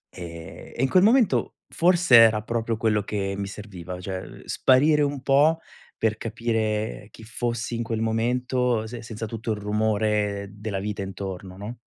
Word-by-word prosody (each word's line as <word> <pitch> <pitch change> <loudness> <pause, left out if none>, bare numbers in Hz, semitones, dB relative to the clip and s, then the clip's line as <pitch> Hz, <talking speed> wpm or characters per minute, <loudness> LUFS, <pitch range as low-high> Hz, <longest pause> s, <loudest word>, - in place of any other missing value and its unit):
E 85 -2 -9
in 130 +2 +1
quel 185 - +5
momento 230 0 +3
forse 175 -6 +4
era 110 -2 +6
proprio 115 0 -1
quello 110 -2 +1
che 100 -2 -2
mi 100 -1 -3
serviva, 95 -4 -8
cioè 95 0 -7
sparire 150 +4 +4
un 140 -2 -2
po' 150 +4 +4 0.4
per 110 -1 0
capire 110 -2 -2
chi 110 - -13
fossi 115 +1 -3
in 120 - -2
quel 115 -1 -3
momento 120 +1 0
se 120 +1 -7
senza 110 0 -6
tutto 115 +1 -4
il - - -5
rumore 105 -1 0
della 105 -1 -4
vita 105 0 -4
intorno, 95 -1 -6
no. 105 +5 -7
110 Hz, 155 wpm, -25 LUFS, 105-120 Hz, 0.4 s, era